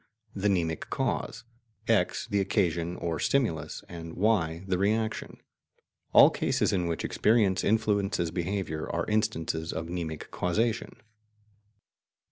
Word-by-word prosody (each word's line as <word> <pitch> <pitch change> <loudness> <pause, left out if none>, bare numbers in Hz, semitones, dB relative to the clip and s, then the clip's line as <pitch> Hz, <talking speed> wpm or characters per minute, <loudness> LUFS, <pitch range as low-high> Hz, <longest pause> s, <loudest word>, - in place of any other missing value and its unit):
the 100 +1 -1
mnemic 85 -4 -1
cause, - - -2 0.4
X - - +2
the 100 - 0
occasion 85 -3 0
or 85 -3 -3
stimulus, 80 - 0
and 85 -1 -8
Y 90 -5 +1
the 90 -2 0
reaction. 110 +3 -1 0.7
All - - +8
cases - - 0
in 90 -3 +1
which 85 -1 -2
experience 105 -4 +2
influences 100 -5 +1
behaviour 85 -2 -3
are 85 0 -1
instances 80 -7 -1
of 80 +1 -4
mnemic 85 -3 -5
causation. 110 +6 -1
90 Hz, 115 wpm, -28 LUFS, 80-105 Hz, 0.7 s, All